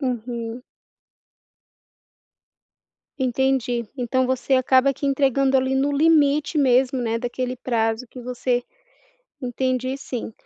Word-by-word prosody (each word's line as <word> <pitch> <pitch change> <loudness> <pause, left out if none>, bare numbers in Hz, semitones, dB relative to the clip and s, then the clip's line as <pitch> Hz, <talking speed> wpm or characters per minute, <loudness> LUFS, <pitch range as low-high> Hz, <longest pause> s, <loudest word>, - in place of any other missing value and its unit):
Uhum. 240 -2 -4 2.6
Entendi, 250 -3 0
então, 255 +1 0
você 260 +1 +1
acaba 260 +1 +3
que 280 - -5
entregando 275 -1 +2
ali, 260 0 +2
no 270 +2 +1
limite 300 0 +3
mesmo, 260 -1 +3
né 230 -1 -1
daquele 250 +1 -3
prazo 230 -1 -1
que 255 - -11
você 245 0 -1 0.8
Entendi 255 +1 -1
sim, 245 -4 -6
255 Hz, 105 wpm, -22 LUFS, 245-270 Hz, 2.6 s, acaba